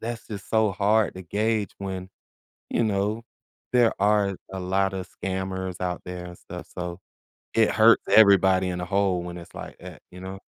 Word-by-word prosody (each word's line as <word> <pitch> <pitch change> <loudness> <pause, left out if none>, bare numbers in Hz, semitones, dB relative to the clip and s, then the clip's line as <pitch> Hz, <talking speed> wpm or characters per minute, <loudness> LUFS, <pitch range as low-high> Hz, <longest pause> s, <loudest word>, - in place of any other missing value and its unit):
that's 115 0 -5
just 100 -3 -7
so 110 -2 +3
hard 105 +2 +2
to 95 - -7
gauge 105 +3 -1
when, 95 -1 -5 0.6
you 120 - +1
know, 105 +2 0 0.5
there 120 -2 +5
are 100 -1 +3 0.2
a 95 - -4
lot 95 +1 0
of 95 -1 -4
scammers 95 -1 -4
out 90 -1 -2
there 90 0 -6
and 90 0 -10
stuff, - - -9
so 90 0 -4 0.6
it 110 -1 +4
hurts 115 +1 +5
everybody 95 -3 +6
in 90 0 -3
a - - -3
whole 95 -2 +1
when 90 0 -7
it's 85 - -12
like - - -8
that, - - -11
you 90 +1 -11
know? 95 +1 -7
95 Hz, 180 wpm, -25 LUFS, 90-105 Hz, 0.6 s, everybody